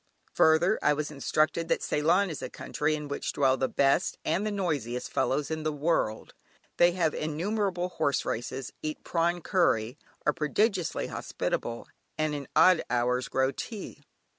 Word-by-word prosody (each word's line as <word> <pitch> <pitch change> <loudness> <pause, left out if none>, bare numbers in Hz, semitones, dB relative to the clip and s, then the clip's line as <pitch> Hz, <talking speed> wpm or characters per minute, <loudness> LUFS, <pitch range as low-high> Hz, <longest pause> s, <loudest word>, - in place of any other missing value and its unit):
Further, 165 +6 +4
I 150 - +4
was 150 +1 -3
instructed 155 +3 0
that - - 0
Ceylon 170 +6 +2
is 155 - -6
a - - -4
country 155 +1 -2
in 150 -1 -6
which 145 - -3
dwell 135 -2 +3
the 130 0 0
best 140 0 +2
(and 170 +6 +1
the - - -1
noisiest!) 145 - -2
fellows 145 +3 0
in 160 0 -2
the 155 0 -1
world. 145 -7 -1 0.4
They 175 0 +5
have 165 -4 +1
innumerable 180 +3 -1
horse 145 -6 0
races, 130 +3 -4
eat 155 0 -4
prawn 170 +1 0
curry, 130 - +1 0.3
are 150 - +3
prodigiously 180 +4 0
hospitable, 115 0 -3 0.3
and 155 -1 0
in 140 -2 -5
odd 185 -2 +6
hours 125 +1 +1
grow 130 0 +1
tea. 215 - -7
155 Hz, 160 wpm, -28 LUFS, 140-175 Hz, 0.4 s, odd